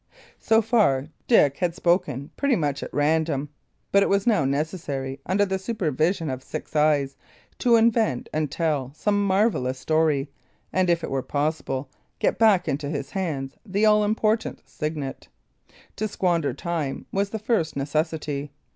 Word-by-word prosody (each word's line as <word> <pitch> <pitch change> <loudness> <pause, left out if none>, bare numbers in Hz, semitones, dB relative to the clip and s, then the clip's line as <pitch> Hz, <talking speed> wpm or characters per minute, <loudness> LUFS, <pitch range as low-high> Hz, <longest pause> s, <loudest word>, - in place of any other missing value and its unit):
So 225 0 +3
far 195 - +2 0.2
Dick 145 - +4
had 175 -2 -1
spoken 150 -7 0
pretty 280 -3 +2
much 145 -6 -1
at - - -6
random; 150 -1 +1 0.4
but 200 - +5
it - - +2
was 200 0 +2
now 215 - +3
necessary, 140 -2 -2
under 200 +2 +2
the 190 -1 -2
supervision 170 - 0
of 130 0 -5
six 155 +3 -7
eyes, 150 -2 +2 0.4
to 240 -1 +4
invent 225 - +2
and 155 -1 0
tell 150 -4 -1
some 205 +3 +1
marvellous 190 - +1
story, 155 -1 +1 0.4
and, 185 -1 +2
if 170 -1 +2
it - - -4
were 135 -1 0
possible, 145 -1 -2 0.3
get - - 0
back 210 -5 +4
into 140 +1 -2
his 140 -3 -4
hands 145 -8 -3
the 205 +1 0
all 210 0 +5
important 215 +1 0
signet. 150 -3 -5 0.7
To 215 - -1
squander 175 -7 0
time 160 -3 -3
was 200 +1 0
the 220 - -3
first 210 -7 0
necessity. 150 0 -2
160 Hz, 155 wpm, -24 LUFS, 140-200 Hz, 0.7 s, but